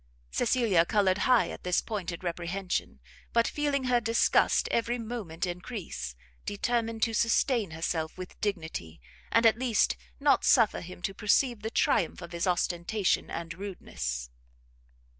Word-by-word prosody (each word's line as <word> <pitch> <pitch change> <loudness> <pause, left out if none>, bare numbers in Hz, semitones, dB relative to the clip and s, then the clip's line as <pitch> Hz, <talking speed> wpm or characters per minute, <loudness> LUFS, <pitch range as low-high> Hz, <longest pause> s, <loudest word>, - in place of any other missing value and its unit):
Cecilia 230 -8 +3
coloured 195 +1 +2
high 250 -2 +4
at - - -9
this 180 -1 +2
pointed 185 -6 -4
reprehension; 175 - -3 0.3
but 235 0 +4
feeling 290 -2 0
her 250 -1 +2
disgust 230 +1 +3
every 235 +1 +1
moment 220 -8 -4
encrease, 175 - -5 0.3
determined 230 +1 -1
to 225 - +1
sustain 230 -1 +2
herself 160 0 -3
with 185 -1 -9
dignity, 160 - -3 0.3
and 230 0 +4
at 225 0 +5
least 230 - +2 0.2
not - - +3
suffer - - +4
him 180 0 -10
to 195 - -1
perceive 215 +3 +2
the 220 - -3
triumph - - +1
of - - -9
his 170 +2 -2
ostentation 180 +3 0
and 170 0 -5
rudeness. 60 - -5
195 Hz, 140 wpm, -29 LUFS, 170-230 Hz, 0.3 s, at